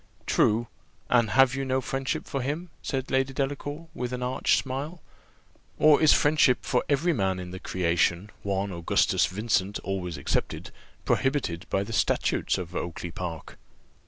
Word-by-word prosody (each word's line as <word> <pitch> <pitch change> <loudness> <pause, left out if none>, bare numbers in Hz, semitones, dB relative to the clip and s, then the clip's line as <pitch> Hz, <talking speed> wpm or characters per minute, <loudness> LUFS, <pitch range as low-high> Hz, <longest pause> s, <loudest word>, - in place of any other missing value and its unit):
"True. 110 +2 +2 0.5
And 120 -3 +4
have 135 0 +5
you 135 0 -2
no 130 0 0
friendship 135 +1 -3
for 135 - -3
him?" 155 +7 -3
said 135 -1 -3
Lady 135 0 +1
Delacour 145 +4 -3
with 125 0 -4
an 125 0 -3
arch 125 +1 +2
smile, 140 +6 -4 0.8
"or 155 -1 +6
is 155 - +7
friendship 145 -4 +4
for 125 - +1
every 155 +5 +2
man 95 -7 0
in 90 -1 -7
the 95 - -7
creation, 85 +2 0
one 100 0 -1
Augustus 85 -2 +2
Vincent 100 0 0
always 90 -5 -3
excepted, 70 - -2 0.3
prohibited 115 - 0
by 95 - +1
the 115 - -7
statutes - - +1
of 90 -1 -6
Oakly 85 0 -4
park?" 85 -3 -7
125 Hz, 155 wpm, -27 LUFS, 95-135 Hz, 0.8 s, is